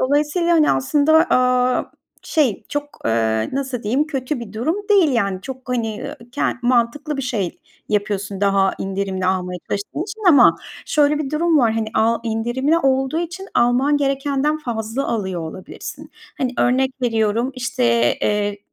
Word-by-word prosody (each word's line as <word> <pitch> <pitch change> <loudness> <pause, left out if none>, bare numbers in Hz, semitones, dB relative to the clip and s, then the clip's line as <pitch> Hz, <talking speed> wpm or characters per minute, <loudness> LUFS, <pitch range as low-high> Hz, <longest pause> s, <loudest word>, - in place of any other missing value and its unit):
Dolayısıyla, 295 +6 +1
hani, 315 -3 +4
aslında, 285 - +2 0.2
aaa, 250 0 +2 0.3
şey 275 -11 0
çok, 290 0 -2 0.2
eee, 110 -1 +1
nasıl 265 -3 -3
diyeyim, 260 +9 +1
kötü 270 -2 -3
bir 230 - -8
durum 255 - -1
değil, 390 -7 +5
yani. 200 -5 0
Çok, 260 +2 -9
hani, 230 -3 -1
eee, - - -7 0.2
ke 285 - -3 0.2
mantıklı 255 +5 +1
bir 275 - -3
şey 210 -8 -2 0.3
yapıyorsun 205 -1 -2
daha 195 -1 +3
indirimli 190 -1 -2
almaya 180 -1 -1
çalıştığın 205 +10 -3
için 435 +2 -8
ama 280 -7 +7 0.3
şöyle 295 0 +2
bir 290 -2 -3
durum 320 0 +2
var, 230 -4 +3
hani, 220 -1 -2
a 225 +1 +2
indirimli 240 +7 0
olduğu 270 +1 +1
için 360 +3 -6
alman 250 +5 +3
gerekenden 280 +2 0
fazla 235 0 -3
alıyor 190 -6 -2
olabilirsin. 160 +3 -8 0.3
Hani, 255 -3 -1
örnek 260 +2 +2
veriyorum, 225 +1 +1
işte, 245 - -2 0.4
eee, 205 -1 0
250 Hz, 150 wpm, -20 LUFS, 210-290 Hz, 0.4 s, ama